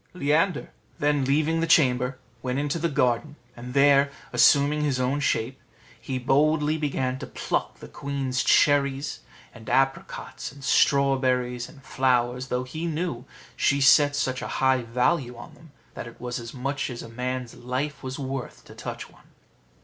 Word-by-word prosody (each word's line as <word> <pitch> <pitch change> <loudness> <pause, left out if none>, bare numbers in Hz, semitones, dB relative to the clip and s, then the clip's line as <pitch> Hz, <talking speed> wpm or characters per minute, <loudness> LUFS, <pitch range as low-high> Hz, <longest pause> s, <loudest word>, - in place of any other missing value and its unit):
Leander, 160 +1 +1 0.3
then 145 -1 +1
leaving 155 +4 +1
the 165 - 0
chamber, 125 -5 +3 0.2
went 125 +1 -2
into 145 +3 -1
the 170 +1 0
garden, 135 0 0 0.2
and 125 +2 -9
there, 140 0 +5 0.2
assuming 140 +5 +4
his 140 -4 0
own 130 +3 0
shape, 130 -2 -1 0.4
he 130 +2 -3
boldly 150 +4 +2
began 135 -4 -2
to - - -7
pluck - - -3
the - - -11
queen's 135 -2 -3
cherries, 140 -1 +2 0.4
apricots, 135 +3 -2
strawberries, 130 -4 +2
and 140 -4 -16
flowers, 125 -2 0
though 125 0 -1
he 155 +6 -5
knew 155 -6 -3 0.3
she 140 - +2
set 145 +1 +5
such 130 -2 -1
a - - -4
high 130 -1 +3
value 125 +2 0
on 120 - -11
them, 160 -2 -18 0.2
that - - -7
it 120 - -13
was 125 0 -4
as 115 -1 -8
much 135 +2 -3
as 120 -2 -6
a - - -9
man's 125 +1 -4
life 135 +4 -4
was 130 0 -5
worth 135 -2 -6
to - - -13
touch - - -7
one. - - -22
135 Hz, 155 wpm, -25 LUFS, 125-145 Hz, 0.4 s, there